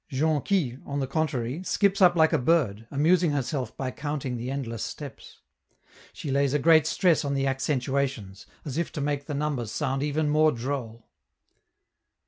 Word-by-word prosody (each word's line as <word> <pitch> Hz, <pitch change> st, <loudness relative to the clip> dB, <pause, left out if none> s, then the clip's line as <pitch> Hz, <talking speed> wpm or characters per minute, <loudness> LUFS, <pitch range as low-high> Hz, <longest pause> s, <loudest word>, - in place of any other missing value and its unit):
Jonquille, 150 Hz, -1 st, 0 dB
on 140 Hz, 0 st, -4 dB
the 135 Hz, -, 0 dB
contrary, 135 Hz, -1 st, -2 dB
skips 200 Hz, +1 st, +1 dB
up 175 Hz, -1 st, +6 dB
like 160 Hz, -1 st, +4 dB
a -, -, +3 dB
bird, 120 Hz, -7 st, +1 dB
amusing 160 Hz, +3 st, +3 dB
herself 130 Hz, -3 st, -3 dB
by 130 Hz, -2 st, -3 dB
counting 140 Hz, -3 st, -4 dB
the 120 Hz, +1 st, -4 dB
endless 125 Hz, -5 st, -4 dB
steps. -, -, -9 dB, 0.7 s
She 145 Hz, -, -6 dB
lays 140 Hz, 0 st, +2 dB
a -, -, +5 dB
great 160 Hz, +1 st, +5 dB
stress 170 Hz, -3 st, +2 dB
on 140 Hz, -1 st, -1 dB
the 135 Hz, 0 st, 0 dB
accentuations, 130 Hz, -6 st, -2 dB, 0.2 s
as 145 Hz, +1 st, -3 dB
if 170 Hz, -, -2 dB
to -, -, -4 dB
make 145 Hz, 0 st, -2 dB
the 150 Hz, -, -3 dB
numbers 140 Hz, -6 st, -2 dB
sound 135 Hz, +1 st, -1 dB
even 150 Hz, +1 st, 0 dB
more 155 Hz, +1 st, +4 dB
droll. 120 Hz, -2 st, -5 dB
140 Hz, 165 wpm, -26 LUFS, 130-155 Hz, 0.7 s, up